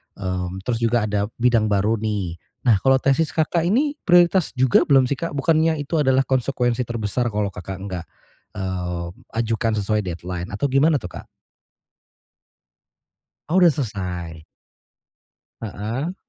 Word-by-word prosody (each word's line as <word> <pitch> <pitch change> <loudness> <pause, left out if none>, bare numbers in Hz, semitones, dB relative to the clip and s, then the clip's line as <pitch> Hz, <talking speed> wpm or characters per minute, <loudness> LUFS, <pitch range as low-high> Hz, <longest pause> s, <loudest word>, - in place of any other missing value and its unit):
eee, 90 -2 -3 0.2
terus 115 +1 -1
juga 115 -1 +2
ada 105 -1 -1
bidang 115 -3 +2
baru 105 +2 +1
nih. 100 -6 -3 0.2
Nah 115 -6 +4
kalau 135 0 +4
tesis 135 +4 +1
Kakak 165 +1 +1
ini 285 - +1
prioritas 175 -2 +4
juga 130 -1 +3
belum 135 -2 +5
sih, 135 +2 -2
Kak? 170 -3 -4
Bukannya 160 +3 +2
itu 155 +2 -1
adalah 135 -1 +3
konsekuensi 125 -1 0
terbesar 120 +1 -2
kalau 105 -2 -1
Kakak 95 +1 -7
enggak, 90 -4 -5 0.5
eee, 90 -2 -3 0.4
ajukan 115 0 0
sesuai 105 +1 +1
deadline 90 -1 -5
atau 120 +6 -2
gimana 150 +3 +4
tuh, 90 -10 -4
Kak? - - -10 2.2
Oh 180 +4 +3
udah 170 - +7
selesai. 90 - -5 1.2
Heeh. 115 - -4
115 Hz, 135 wpm, -22 LUFS, 100-140 Hz, 2.2 s, udah